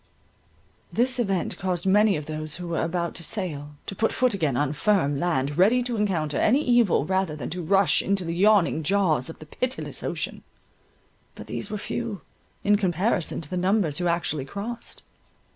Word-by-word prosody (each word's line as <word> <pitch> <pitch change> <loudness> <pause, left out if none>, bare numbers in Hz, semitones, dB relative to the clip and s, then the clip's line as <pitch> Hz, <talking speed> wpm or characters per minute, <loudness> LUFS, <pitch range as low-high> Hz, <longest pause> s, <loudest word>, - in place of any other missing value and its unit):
This 255 +2 +1
event 195 -6 -1
caused 180 -2 -1
many 205 +1 +4
of 150 - -6
those 155 0 -4
who 175 0 -6
were 165 - -1
about 170 0 -1
to 170 - -4
sail, 150 -7 -4
to - - -5
put 225 +4 +1
foot 255 -3 +2
again 155 -10 0
on 145 0 0
firm 145 -3 +1
land, 145 -3 0
ready 235 +7 +5
to 240 -1 -2
encounter 170 -9 0
any 270 +7 +3
evil 240 - +3
rather 190 -3 0
than 145 -5 -6
to 180 +2 -3
rush 195 +3 +3
into 195 -2 +1
the 165 - -2
yawning 190 -3 +3
jaws 160 -6 +1
of 160 - -8
the 155 - -12
pitiless 255 - -4
ocean. - - -3 0.9
But - - -9
these - - -5
were 210 - -3
few, 220 0 -4 0.4
in 205 0 +4
comparison 185 -1 0
to 150 - -6
the 180 - -1
numbers 180 -4 +1
who 175 - 0
actually 170 -5 0
crossed. 220 - -6
180 Hz, 180 wpm, -25 LUFS, 155-210 Hz, 0.9 s, ready